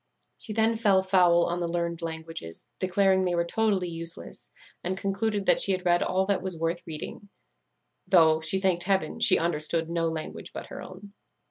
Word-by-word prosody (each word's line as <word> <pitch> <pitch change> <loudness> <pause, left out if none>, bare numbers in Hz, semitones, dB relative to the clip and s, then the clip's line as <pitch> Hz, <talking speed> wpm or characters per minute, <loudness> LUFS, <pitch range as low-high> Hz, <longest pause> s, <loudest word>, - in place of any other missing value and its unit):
She 220 - -8
then 225 +1 +1
fell 200 -4 +3
foul 180 -3 +4
on 175 +1 -2
the 175 - -1
learned 170 0 -2
languages, 160 - -7
declared 190 0 +2
they 175 - 0
were 170 0 +1
totally 200 -1 0
useless, 165 0 -7 0.3
and 185 +2 -2
concluded 200 +1 -1
that - - +4
she 195 - +4
had 185 0 -4
read 175 0 +3
all 190 +1 +1
that 195 -2 0
was 185 -2 -3
worth 165 +1 -2
reading, 160 +5 -8 0.8
though, 160 -4 +5
she 160 +5 0
thanked 185 -3 +1
heaven, 190 -5 0
she - - +5
understood 165 0 -1
no 165 -1 0
language 160 -1 -7
but - - -6
her - - -7
own. 195 +2 -11
175 Hz, 185 wpm, -27 LUFS, 165-195 Hz, 0.8 s, though